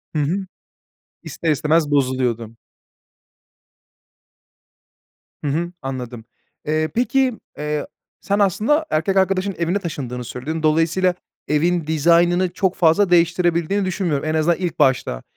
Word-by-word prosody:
Hı 150 - +1
hı. 185 +7 -1 0.8
İster 165 - -2
istemez 150 +1 +1
bozuluyordun. 125 -5 0 2.9
Hı - - -2
hı, 170 +4 -2
anladım. 125 -3 -6 0.4
Eee, 155 +1 0
peki, 250 0 +1 0.2
eee, 150 0 -3 0.3
sen, 200 +1 0
aslında, 220 - +2
erkek 175 +5 0
arkadaşının 190 0 +1
evine 170 +4 -1
taşındığını 125 -8 -5
söyledin. 155 +7 -5
Dolayısıyla, 165 +4 +2 0.3
evin 165 +2 +1
dizaynını 170 +3 +3
çok 190 -1 0
fazla 175 +3 +3
değiştirebildiğini 175 +2 +2
düşünmüyorum. 175 -6 -1
En 155 - 0
azından 160 +2 +2
ilk 180 -3 -4
başta. 125 - +1
165 Hz, 115 wpm, -20 LUFS, 150-185 Hz, 2.9 s, dizaynını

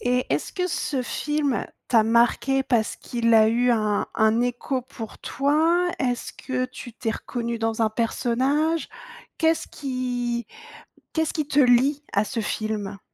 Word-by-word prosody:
Et 250 +1 +1
est-ce - - -1
que 360 -1 -1
ce 295 -5 -2
film 295 +1 -1 0.2
t'a 230 -3 +5
marqué 235 +4 +3
parce 230 -5 0
qu'il 230 -1 0
a 220 -1 +7
eu 245 +2 +2
un 215 -3 +1
un 220 +1 +3
écho 245 +2 -1
pour 235 -3 -9
toi? 320 +6 +2
Est-ce 245 -3 -2
que 255 -1 -3
tu 255 -1 -9
t'es 225 -1 -2
reconnu 235 -1 -4
dans 225 0 0
un 220 - +2
personnage? 265 +8 0 0.5
Qu'est-ce 325 0 +2
qui 245 -3 -3 0.7
qu'est-ce 320 -1 0
qui 305 -3 -2
te 290 0 +2
lie 270 +3 +4
à 200 - +3
ce 225 +3 -4
film? 210 -2 -3
245 Hz, 150 wpm, -24 LUFS, 230-280 Hz, 0.7 s, a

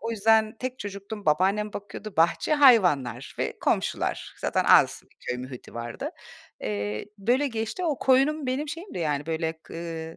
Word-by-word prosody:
o 230 - -3
yüzden 220 0 +3
tek 255 0 -4
çocuktum, 200 0 -7
babaannem 195 +7 +2
bakıyordu. 205 0 -8
Bahçe, 170 - +3
hayvanlar 175 - +4
ve - - -2
komşular. - - -1
Zaten - - 0
az - - +5
bir - - -29
köy 125 - -3
muhiti 125 0 -9
vardı. 120 0 -5 0.5
Eee, 105 0 -3
böyle 245 +8 +2
geçti. 225 +7 -3
O 305 -5 0
koyunum 275 +3 +3
benim 270 +4 -1
şeyimdi 335 - -6
yani 150 -3 -1
böyle 160 0 -1
k - - -13
ııı, 165 -1 -6
200 Hz, 160 wpm, -26 LUFS, 160-255 Hz, 0.5 s, az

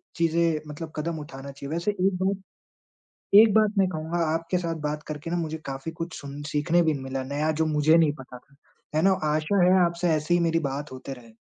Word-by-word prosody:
चीज़ें 165 -1 +2
मतलब 155 +2 -7
कदम 160 +1 -3
उठाना 140 -2 -8
चाहिए। 140 +2 -7
वैसे 170 +5 0
एक 195 -1 +1
बात 195 0 0 1.0
एक 220 -2 +5
बात 215 -1 +4
मैं 195 -1 +4
कहूँगा 160 0 -3
आपके 165 +3 -1
साथ 170 -2 -2
बात 150 +1 -4
करके 150 +2 -6
ना 175 - 0
मुझे 160 -1 -3
काफ़ी 135 +3 -5
कुछ 165 +1 -6
सुन 140 +1 -8
सीखने 165 +4 +3
भी 160 -2 +2
मिला 135 0 -4
नया 145 +4 -1
जो 160 - +3
मुझे 155 +1 +4
नहीं 160 -3 +4
पता 125 -1 -10
था। 140 +3 -23 0.4
है 155 - +3
ना? 195 - +5
आशा 155 +5 +2
है 185 - +5
आपसे 170 0 -1
ऐसे 155 +3 0
ही 175 - +4
मेरी 165 -1 +2
बात 145 +1 -5
होते 130 +1 -7
रहे। 115 -3 -15
160 Hz, 215 wpm, -26 LUFS, 145-170 Hz, 1.0 s, एक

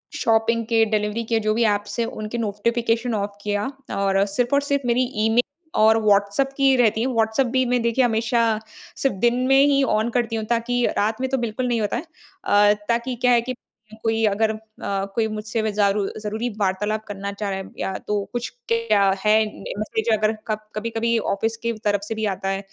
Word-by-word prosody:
Shopping 230 0 +1
के 225 -1 +3
delivery 215 +1 -1
के 225 -1 +2
जो 215 0 0
भी 235 - +1
एप्स 205 +2 -6
हैं 230 - +2
उनके 215 +2 -5
नोटिफिकेशन 230 +2 0
ऑफ 200 0 -3
किया 205 +4 -1 0.2
और 195 0 +2
सिर्फ़ 240 +6 -1
और 280 - +3
सिर्फ़ 280 -2 -1
मेरी 240 +2 +3 0.2
ईमेल 225 +2 +4 0.4
और 220 +1 +6
व्हाट्सएप 205 +5 +2
की 270 -1 +4
रहती 225 -2 +3
है। 255 - +1
व्हाट्सएप 230 +1 +1
भी 260 - +3
मैं 245 - +2
देखिए 235 +2 +2
हमेशा 230 +1 +1 0.6
सिर्फ़ 270 -6 0
दिन 240 - +2
में 270 0 +5
ही 275 -1 +3
ऑन 220 +2 0
करती 230 -1 0
हूँ 220 -1 -2
ताकि 245 +1 0
रात 220 +4 0
में 260 - -1
तो 265 - 0
बिल्कुल 240 +1 -2
नहीं 235 -2 0
होता 205 +2 -1
है। 275 - -4 0.4
अ, 205 - +5 0.2
ताकि 235 +2 0
क्या 250 +1 +2
है 235 - +4
कि 255 +2 -4 0.5
कोई 225 0 +1
अगर 215 +2 +2
अ, 215 - -5 0.6
कोई 225 -1 +2
मुझसे 215 +1 -3
व 220 - 0
ज़ारू 200 -1 +1
ज़रूरी 220 +3 -3
वार्तालाप 210 +2 0
करना 200 0 -5
चाह 200 0 -4
रहा 190 0 -2
है 190 - -8
या 190 - -2
तो 205 -1 0
कुछ 240 0 -2 0.2
क्या 230 -3 +3 0.2
है 210 +1 +5 0.2
न - - -11
इस 215 +1 -4
बीच 220 +1 0
अगर 215 +1 +1
कब 215 -1 -1 0.2
कभी-कभी 230 +1 0 0.2
ऑफिस 220 +3 -1
की 235 - +1
तरफ 205 -1 +2
से 225 - -3
भी 220 0 -2
आता 195 +1 -4
है 195 0 -1
225 Hz, 210 wpm, -22 LUFS, 210-235 Hz, 0.6 s, और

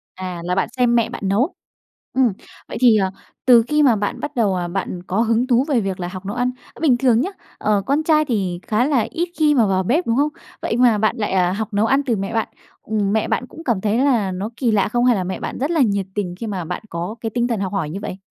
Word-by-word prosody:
À, 185 -2 -6
là 180 +1 0
bạn 190 - 0
xem 245 -1 +3
mẹ 235 -2 +3
bạn - - -7
nấu. 240 - +1 0.6
Ừm, 255 -5 +3 0.4
vậy - - -6
thì, 235 -4 +6
ờ, 190 -2 +1 0.4
từ 240 -2 +7
khi 300 0 +3
mà 245 -6 +5
bạn 205 0 -3
bắt 295 0 -5
đầu, 210 -6 +2
ờ, 175 -1 -2
bạn 180 -1 -4
có 195 +5 0
hứng 230 +2 +2
thú 250 +1 +3
về 255 -6 +2
việc 190 -2 -3
là 175 - -3
học 185 +1 -8
nấu 205 - -4
ăn, 250 0 +1 0.3
bình 275 -7 +4
thường 240 -2 +3
nhá, 375 - -1 0.3
ờ, 205 -2 +1
con 285 +3 +2
trai 310 -1 +3
thì 195 -9 -1
khá 220 +3 +2
là 265 -6 +2
ít 345 +1 -2
khi 300 -1 +4
mà 230 -5 +4
vào 190 -1 +1
bếp, 300 - +1
đúng 230 +1 +1
không? 290 +2 +3 0.3
Vậy 225 - -1
mà 240 -4 +4
bạn 215 +1 +1
lại, 210 -3 -2
à, 180 -1 +2
học 215 +1 -4
nấu 210 +2 +3
ăn 270 +4 +3
từ 235 -3 +1
mẹ 195 +3 -4
bạn. 225 - 0 0.3
Ừm, 205 -2 -1
mẹ 220 - +1
bạn 250 - -1
cũng 325 +5 -12
cảm 230 -7 0
thấy 215 +3 0
là 235 -9 +2
nó 195 +5 -4
kỳ 245 -4 +1
lạ 210 -2 +2
không 240 +2 +1
hay 245 -3 +4
là 185 - -1
mẹ 185 - -4
bạn - - -5
rất 280 +5 -1
là 325 -3 +1
nhiệt 200 -5 +2
tình 185 -4 -2
khi 230 - -5
mà 190 -5 -3
bạn - - -5
có 170 +6 -4
cái 225 - -3
tinh 240 +2 0
thần 225 -4 -1
học 195 0 -2
hỏi 170 -7 -2
như 190 - -4
vậy? 190 -2 -6
220 Hz, 280 wpm, -20 LUFS, 195-250 Hz, 0.6 s, từ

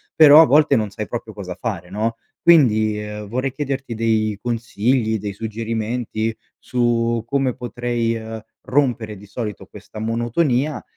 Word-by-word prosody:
però 155 0 +9
a 165 - +7
volte 145 0 +4
non 110 -2 -1
sai 105 0 -5
proprio 115 -2 -6
cosa 95 -3 -6
fare, 90 -5 -5
no? 110 +3 -1 0.3
Quindi, 110 -10 +4
uhm, 105 0 -7
vorrei 130 +5 -2
chiederti 135 -4 -3
dei 110 -2 +1
consigli, 115 -1 0
dei 100 0 -4
suggerimenti 110 +1 -3 0.2
su 120 -1 0
come 135 -2 0
potrei, 120 -1 -2
uhm, 110 0 -6 0.2
rompere 120 -6 0
di 105 - -13
solito 105 -2 -5
questa 105 +1 -11
monotonia, 120 +6 0
115 Hz, 140 wpm, -21 LUFS, 110-125 Hz, 0.3 s, però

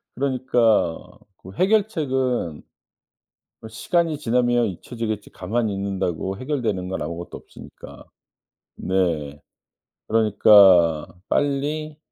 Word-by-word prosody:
그러니까 125 -9 +1 0.4
그 95 - -13
해결책은 135 - 0 1.0
뭐 110 - -10
'시간이 165 +7 -1
지나면 120 -2 +1
잊혀지겠지.' 110 +2 -5
가만히 110 +3 -2
있는다고 95 -2 -3
해결되는 115 -9 -3
건 95 - -4
아무것도 85 +1 -6
없으니까. - - -14 0.7
네. 80 -6 -1 0.7
그러니까 100 -7 +5 0.2
'빨리 150 +2 -1
110 Hz, 240 characters per minute, -22 LUFS, 95-130 Hz, 1.0 s, 그러니까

